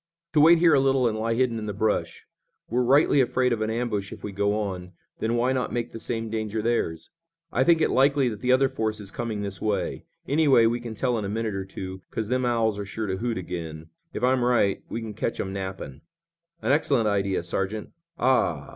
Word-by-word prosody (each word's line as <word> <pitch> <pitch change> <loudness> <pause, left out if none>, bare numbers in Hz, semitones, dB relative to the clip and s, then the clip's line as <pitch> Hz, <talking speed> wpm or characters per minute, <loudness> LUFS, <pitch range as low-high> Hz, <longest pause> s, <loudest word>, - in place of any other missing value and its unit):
"To 150 - +5
wait 165 +3 +7
here 165 -1 +5
a 140 - +5
little 135 -2 +3
and 110 - -1
lie 115 +1 0
hidden 120 -2 +1
in 105 - -5
the 105 - -4
brush. 110 +1 -1 0.5
We're 125 +2 +2
rightly 140 +2 +4
afraid 125 0 +1
of 110 - -3
an 110 - 0
ambush 110 -4 -2
if - - -10
we 105 - -4
go 100 +2 0
on, 90 -3 -5 0.3
then 115 +1 0
why 125 +2 +2
not 130 -1 -1
make 120 -1 -3
the 115 - -8
same 115 -1 -3
danger 110 -1 -2
theirs? 85 -8 -1 0.4
I - - +2
think 170 -1 +4
it - - +2
likely 140 0 +3
that 105 -3 -6
the 125 - +1
other 130 +1 +5
force 110 -5 -2
is 100 -2 -5
coming 110 -4 -3
this 100 -2 -4
way. 100 -4 -2 0.2
Anyway, 140 -5 +4
we 120 +1 +1
can 120 -2 -7
tell 120 +1 0
in 105 - -3
a - - -3
minute 110 0 -2
or 95 -1 -4
two, 95 0 -7
'cause 110 -1 -4
them 130 0 +1
owls 110 -3 +1
are 100 - -4
sure 110 +3 -4
to 95 -2 -2
hoot 115 +2 -2
again. 80 -3 -6 0.2
If - - -5
I'm 130 0 +3
right, 120 -5 +2
we 115 - -4
can 110 -2 -6
catch 110 - -3
'em 95 - -3
napping." 95 -8 -6 0.6
"An - - +2
excellent 140 -6 +2
idea, 100 -3 0
Sergeant. 95 +4 -3 0.3
Ah! 105 - +1
110 Hz, 225 wpm, -25 LUFS, 100-125 Hz, 0.6 s, wait